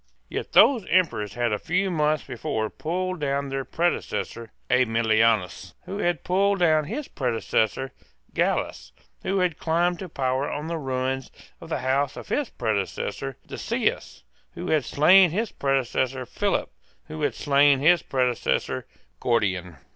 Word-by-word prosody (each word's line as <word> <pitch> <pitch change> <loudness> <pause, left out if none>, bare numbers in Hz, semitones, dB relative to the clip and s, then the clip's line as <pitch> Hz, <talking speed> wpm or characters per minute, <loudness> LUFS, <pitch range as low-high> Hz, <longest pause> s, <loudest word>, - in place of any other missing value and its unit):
Yet - - -5
those 235 -1 +6
Emperors 150 - +1
had 120 -2 0
a 105 - -1
few 185 +3 0
months 155 -2 +1
before 110 -4 -3
pulled 185 +2 -3
down 140 -1 -1
their 135 0 -2
predecessor 150 -8 -2 0.2
Aemilianus, 115 -5 +2
who 200 - -5
had 175 -6 0
pulled 195 +2 +2
down 155 -4 +3
his 260 - -4
predecessor 120 0 -1 0.4
Gallus, - - -1 0.3
who 195 - -1
had 180 -4 0
climbed 170 +2 +1
to 190 - -6
power 130 -1 -1
on 150 +1 -4
the 165 0 -3
ruins 130 -1 -2 0.3
of - - -10
the - - -2
house 135 +1 +1
of - - -9
his 290 -5 0
predecessor 100 - -3
Decius, - - -2 0.3
who - - -4
had 155 -5 +2
slain 180 +5 +6
his 210 +7 -2
predecessor 130 -1 -1
Philip, - - -1 0.3
who 80 - -7
had - - 0
slain 140 0 +4
his 165 +4 +4
predecessor 125 - -1 0.3
Gordian. 95 - 0
140 Hz, 140 wpm, -25 LUFS, 120-175 Hz, 0.4 s, those